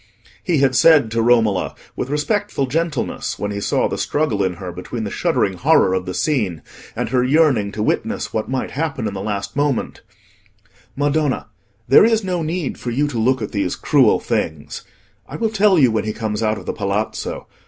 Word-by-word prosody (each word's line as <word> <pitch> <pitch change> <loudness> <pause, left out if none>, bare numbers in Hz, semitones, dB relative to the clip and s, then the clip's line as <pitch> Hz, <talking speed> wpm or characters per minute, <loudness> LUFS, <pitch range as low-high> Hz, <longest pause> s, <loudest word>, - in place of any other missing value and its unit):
He 170 -3 +1
had 135 -2 +2
said 145 -5 +5
to 115 0 +1
Romola, 115 -5 +2 0.2
with 125 - -4
respectful 150 +1 -1
gentleness, 155 +1 -2
when 105 0 -3
he 100 - -3
saw - - +1
the - - -4
struggle 125 -10 0
in 95 -1 0
her 90 0 -7
between 110 +6 -6
her 100 - -4
shuddering - - 0
horror 95 - +4
of 95 -1 -2
the 90 - -4
scene 105 - -1 0.3
and - - -2
her 125 -2 +2
yearning 130 -7 +3
to 105 - -2
witness - - -2
what 110 - -2
might 130 -1 -2
happen 145 -5 -3
in 100 - -4
the 95 - -5
last 100 -1 -4
moment— 145 -3 -1 0.9
"Madonna, 145 -3 0 0.4
there 135 - +7
is 225 -1 +3
no 180 -2 -1
need 160 -1 -3
for 125 - -4
you 140 +5 0
to 120 -5 -3
look 130 +1 +1
at 105 - -5
these 100 -4 -1
cruel - - +3
things. 80 -2 -3 0.5
I - - -7
will 225 -2 -1
tell 205 -3 +4
you 130 -6 +5
when 110 - -1
he 110 - -2
comes 110 -1 -3
out 110 -1 +1
of - - -10
the - - -3
Palazzo. 100 +2 -3
125 Hz, 195 wpm, -20 LUFS, 105-150 Hz, 0.9 s, there